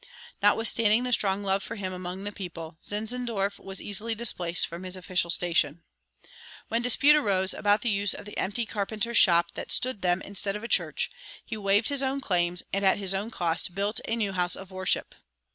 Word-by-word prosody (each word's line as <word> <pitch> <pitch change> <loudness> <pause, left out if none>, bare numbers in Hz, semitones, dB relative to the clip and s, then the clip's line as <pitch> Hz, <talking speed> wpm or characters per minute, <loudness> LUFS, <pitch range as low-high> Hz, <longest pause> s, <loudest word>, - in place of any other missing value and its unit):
Notwithstanding 225 0 +4
the 250 0 -1
strong 200 -2 +1
love 195 0 0
for 230 - -7
him 190 -3 -4
among 180 +1 -6
the 205 - -4
people, 165 -5 -8
Zinzendorf 215 -2 -2
was 195 -1 -5
easily 220 +3 -3
displaced 180 -6 0
from 170 +1 -8
his 185 0 -5
official 180 -1 -1
station. 165 -2 +1 0.9
When 230 - 0
dispute 275 +5 +6
arose 195 -9 +1
about 205 0 +2
the 240 - +1
use 200 0 +1
of - - -9
the 210 - -10
empty 220 +5 -1
carpenter's 220 +2 -2
shop 170 -2 +4
that - - -6
stood 255 -5 +1
them 180 0 +1
instead 200 0 -4
of 210 - -6
a - - -4
church, - - +1 0.3
he 225 - -5
waived 205 +1 +2
his 280 -1 +2
own 270 +1 0
claims 175 -7 0
and 195 +1 0
at 190 - +4
his 195 -1 -1
own 200 +3 -2
cost 175 -3 -2
built 200 +2 +1
a 225 - 0
new 210 -4 -1
house 180 -1 +2
of 195 0 -11
worship. 185 0 -1
200 Hz, 195 wpm, -27 LUFS, 185-220 Hz, 0.9 s, dispute